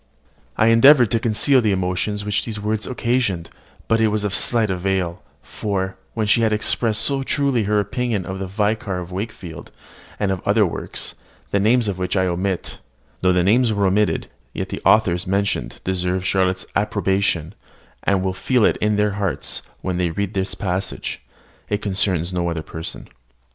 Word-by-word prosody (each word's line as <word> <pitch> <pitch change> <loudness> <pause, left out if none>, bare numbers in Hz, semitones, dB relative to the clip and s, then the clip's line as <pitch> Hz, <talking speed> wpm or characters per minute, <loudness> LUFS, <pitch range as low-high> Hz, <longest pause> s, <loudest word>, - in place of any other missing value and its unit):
I 110 - +4
endeavoured 120 0 +7
to 115 - +2
conceal 125 +4 +3
the 110 -3 +2
emotion 90 +2 -1
which 105 0 -1
these 110 -2 -5
words 105 +1 -2
occasioned, 120 -9 -1 0.4
but 115 0 +2
it 110 - +4
was 105 0 0
of 100 -1 -1
slight 115 -3 +3
avail; 90 -2 -1 0.2
for, 95 -2 -3 0.2
when 110 -2 0
she 110 +3 +4
had 110 -1 +2
expressed 110 +1 +1
so 140 +2 0
truly 135 -4 +1
her 105 +1 +2
opinion 110 -2 -1
of 95 0 -5
"The 95 - -3
Vicar 105 0 -1
of 90 0 -6
Wakefield," 95 -4 -6 0.5
and 100 -2 +1
of 95 - -2
other 105 +1 +3
works, 85 - -4 0.4
the 100 - +2
names 115 +3 +3
of 95 -2 -2
which 90 +2 -1
I 95 - +3
omit 90 +1 -2 0.4
(Though 90 - +4
the 90 -1 +3
names 115 +6 +4
are 100 -2 +1
omitted, 100 +2 +2 0.3
yet - - -4
the - - -5
authors 90 -4 +3
mentioned 100 +1 -1
deserve 90 0 -1
Charlotte's 95 -1 +1
approbation, 100 -4 0 0.5
and 95 -1 +1
will 95 -1 0
feel 125 +4 +2
it - - +2
in 105 0 +1
their 105 0 +2
hearts 100 -3 -2 0.2
when 90 -2 -2
they 90 -1 +1
read 100 +3 -3
this 95 0 -1
passage. 95 -2 -3 0.5
It 105 0 -1
concerns 95 -3 0
no 85 -1 0
other 85 -2 -3
person.) 80 +1 -6
100 Hz, 175 wpm, -21 LUFS, 95-110 Hz, 0.5 s, endeavoured